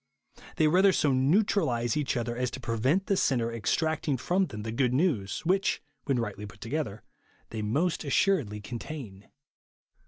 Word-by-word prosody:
They 155 - +3
rather 190 +5 +5
so 145 -6 +2
neutralise 130 - +2
each 145 -4 0
other 120 0 -2
as 125 0 -1
to - - -7
prevent 130 - 0
the 200 - +1
sinner 120 -9 +1
extract 155 +9 -1
ing 140 -3 +2
from 185 +8 +1
them 105 -1 -7
the 110 - -4
good 125 +1 +1
news 120 - 0
which, 195 +4 +2 0.3
when 135 -3 +1
rightly 105 -3 -3
put 100 -1 -15
together, 115 -3 -3 0.5
they 110 - -4
most 155 +12 0
assuredly 140 - +1
contain. 115 -3 -8
130 Hz, 160 wpm, -28 LUFS, 115-160 Hz, 0.5 s, rather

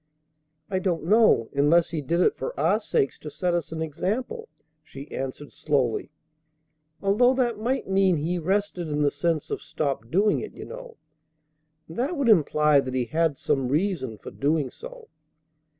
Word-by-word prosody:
"I 190 +1 -1
don't 180 -3 -1
know, 205 - +4
unless 155 +4 +3
He 160 -3 -2
did 170 +6 0
it - - +3
for 135 - -5
our 175 +8 +3
sakes 140 -10 -1
to 155 - -7
set 175 +5 -1
us 170 -2 -2
an 160 0 -3
example," 220 - -3 0.3
she 140 -1 -11
answered 135 +2 -6
slowly, 135 -7 0 0.9
"although 240 +6 +4
that 240 -4 0
might 250 +5 -1
mean 190 -2 +3
He 170 +4 -1
rested 190 0 -1
in 150 -1 0
the 145 - +3
sense 155 +1 -1
of - - -3
stopped 135 -6 -3
doing 205 - +2
it, - - -7
you - - -8
know. - - -10 0.9
And 165 - -11
that 295 +7 -1
would 275 -4 +1
imply 150 -6 +4
that 130 -1 -3
He 125 -2 0
had 160 +1 0
some 135 -1 0
reason 145 - -1
for - - -10
doing 145 -1 0
so. - - -11
165 Hz, 170 wpm, -25 LUFS, 145-205 Hz, 0.9 s, know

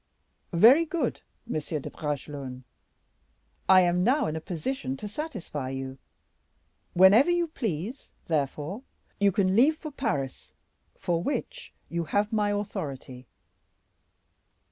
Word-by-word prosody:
Very 245 - +7
good, 315 -6 -2 0.2
Monsieur 155 -7 -3
de 140 - -6
Bragelonne; 140 -3 -5 1.1
I 190 -1 +8
am 180 0 +2
now 265 +5 +3
in 155 - -2
a 160 - -4
position 160 - -3
to 210 - -6
satisfy 205 - -5
you; 135 0 -5 0.9
whenever 195 - +7
you 345 0 +2
please, 225 - -4 0.2
therefore, 155 - -2 0.4
you 200 0 +4
can 190 0 +2
leave 290 +8 +5
for 310 -1 -7
Paris, 145 - -3 0.4
for 170 -1 -1
which 285 - -4 0.2
you 170 0 -2
have 205 +7 0
my 210 -1 +2
authority." 150 - -4
185 Hz, 120 wpm, -27 LUFS, 150-235 Hz, 1.1 s, I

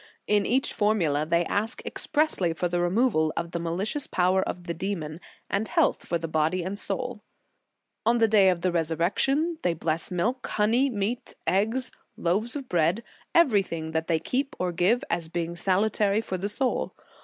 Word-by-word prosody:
In 205 -1 +2
each 265 +3 +1
formula 170 -9 +1
they 170 +1 +2
ask 220 +7 -2
expressly 295 - +1
for 175 +2 -1
the 175 0 -1
removal 175 -4 +2
of 170 0 -2
the 170 - -2
malicious 190 - -1
power 185 +1 +2
of 180 - -4
the 170 -1 -3
demon, 165 -3 -4 0.3
and 205 +2 -1
health 330 -3 +1
for 170 - +1
body 160 +2 0
and 195 +3 -4
soul. 250 -3 -4 0.4
" - - -54
On 235 +1 +4
the 225 -1 +4
day 205 -3 +5
of 180 -2 0
the 185 - +1
Resurrection 185 - +1
they 170 - +1
bless 160 0 -1
milk, 235 +9 -1
honey, 230 +6 +2
meat, 220 +1 -3
eggs, 225 +7 +1 0.3
loaves 210 - 0
of 275 -3 -5
bread, 175 +5 +1 0.3
everything 195 - +2
that 160 0 -1
they 165 - +2
keep 265 - -2
or 180 -1 -1
give, 185 +8 +2
as 170 -2 -1
being 170 0 -3
salutary 200 +3 +2
for 205 -4 -4
the 200 +3 -2
soul. 255 +4 -1
190 Hz, 175 wpm, -26 LUFS, 170-230 Hz, 0.4 s, day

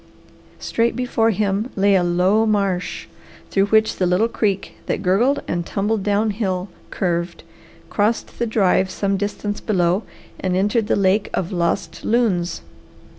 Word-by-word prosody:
Straight 230 +1 0
before 245 -3 +1
him 210 +2 0
lay 200 0 +3
a 190 - +4
low 185 +6 +2
marsh, 195 -4 -1 0.5
through 195 0 +2
which 220 +1 +2
the 180 - +1
little 180 +6 +3
creek 200 -4 -1
that - - -2
gurgled 235 +10 +2
and 175 0 -1
tumbled 205 +4 -1
down 205 +2 +1
hill 190 -3 -2 0.2
curved, 170 -2 -2 0.5
crossed 215 +3 -1
the 235 - 0
drive 190 -3 +2
some 200 +1 -1
distance 205 +1 -3
below, 180 -2 +1 0.4
and 185 -1 -1
entered 210 +3 +1
the - - +2
lake 195 +1 +2
of 180 - -2
Lost 170 -2 -2
Loons. 190 -8 +1
200 Hz, 145 wpm, -21 LUFS, 185-220 Hz, 0.5 s, a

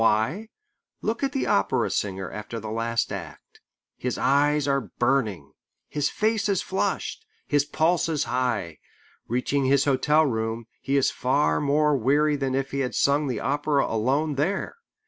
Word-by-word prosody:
Why? 115 - +1 0.5
Look 225 +2 -1
at 275 -1 0
the 270 - -1
opera 100 - +1
singer 95 -2 -2
after 105 +3 -6
the 110 0 -6
last 115 +1 -1
act. - - -9 0.4
His 125 - -2
eyes 145 +1 +2
are 140 -7 0
burning. 120 - 0 0.4
His 145 -1 0
face 215 0 0
is 195 -3 +1
flushed. 190 - -2 0.2
His 145 -1 +2
pulse 165 +3 +1
is 155 -3 0
high. 115 - -2 0.5
Reaching 130 +3 0
his 135 +1 +3
hotel 150 +3 +3
room, 115 -2 -2 0.2
he 140 +1 0
is 135 - +3
far 75 - +1
more 150 +1 +3
weary 145 +4 +2
than 135 -2 -1
if 135 0 -2
he 140 - -2
had 130 -2 -2
sung 145 +1 +2
the 120 -5 -2
opera 145 0 +1
alone 135 +7 0
there. 185 - -1
140 Hz, 160 wpm, -25 LUFS, 115-150 Hz, 0.5 s, his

